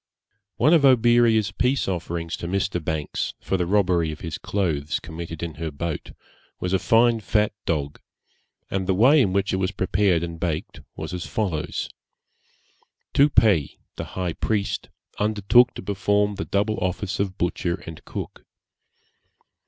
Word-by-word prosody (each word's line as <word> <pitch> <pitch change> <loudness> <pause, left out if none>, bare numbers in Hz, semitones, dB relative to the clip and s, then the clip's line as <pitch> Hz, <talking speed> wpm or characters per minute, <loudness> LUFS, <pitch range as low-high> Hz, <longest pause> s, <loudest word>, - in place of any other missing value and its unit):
One 155 - +4
of 160 -4 +5
Oberea's 120 -5 +4
peace 125 +6 0
offerings 85 -2 -3
to 85 - -5
Mr. 95 -2 -1
Banks, 75 -2 -3
for - - -2
the 90 -2 0
robbery 90 -5 +2
of 75 - -9
his 80 -3 -5
clothes 80 -8 -1
committed 80 0 -7
in 85 -2 -4
her 80 - -2
boat, 75 +1 -5 0.5
was 90 +1 -2
a 95 - +3
fine 115 +2 +4
fat 105 0 +1
dog, 75 -5 -2 0.7
and 95 -1 -1
the 95 - +2
way 135 +9 +6
in 100 -7 +2
which 100 +1 0
it - - +1
was 95 -1 0
prepared 95 -3 +1
and 85 -1 -5
baked 80 -3 -3
was 80 +2 -6
as 90 -1 -4
follows. 90 -8 -2 1.3
Tupei, 110 - +4 0.2
the - - -4
high 90 -3 -1
priest, 105 -2 -2 0.3
undertook 105 +4 +4
to - - -7
perform 100 +1 +1
the 100 - -4
double 105 +2 0
office 95 +2 -2
of 95 -1 -2
butcher 90 0 -2
and 80 -2 -9
cook. - - -7
95 Hz, 150 wpm, -24 LUFS, 85-105 Hz, 1.3 s, way